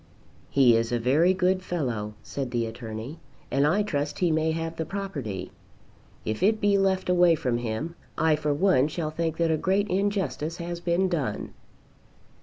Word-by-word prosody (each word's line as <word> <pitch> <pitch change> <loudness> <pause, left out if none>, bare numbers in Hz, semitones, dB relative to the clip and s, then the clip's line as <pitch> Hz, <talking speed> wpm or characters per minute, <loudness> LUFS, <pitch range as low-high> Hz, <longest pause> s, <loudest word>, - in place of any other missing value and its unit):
"He 130 -4 +5
is 115 +1 0
a 120 - +2
very 140 +10 +3
good 185 0 +1
fellow," 120 - -3
said 135 -3 -4
the 120 -1 -1
Attorney, 115 +5 -7 0.3
"and 140 +3 +3
I 195 +7 +2
trust 145 -7 -2
he 175 -2 +2
may 160 0 +1
have 165 0 -3
the 160 - -1
property. 145 - -5 0.7
If 110 0 -2
it 215 +3 +3
be 205 -1 +3
left 190 -1 +1
away 180 -2 +5
from 125 -5 -1
him, 120 +8 -3 0.2
I 160 -1 +3
for 150 0 -1
one 145 -3 +3
shall 155 -1 -3
think 160 0 -2
that 165 -1 +2
a 160 - +2
great 195 +5 +1
injustice 180 -5 -1
has 170 0 -5
been 175 +2 +1
done." 150 - -2
160 Hz, 175 wpm, -26 LUFS, 125-180 Hz, 0.7 s, He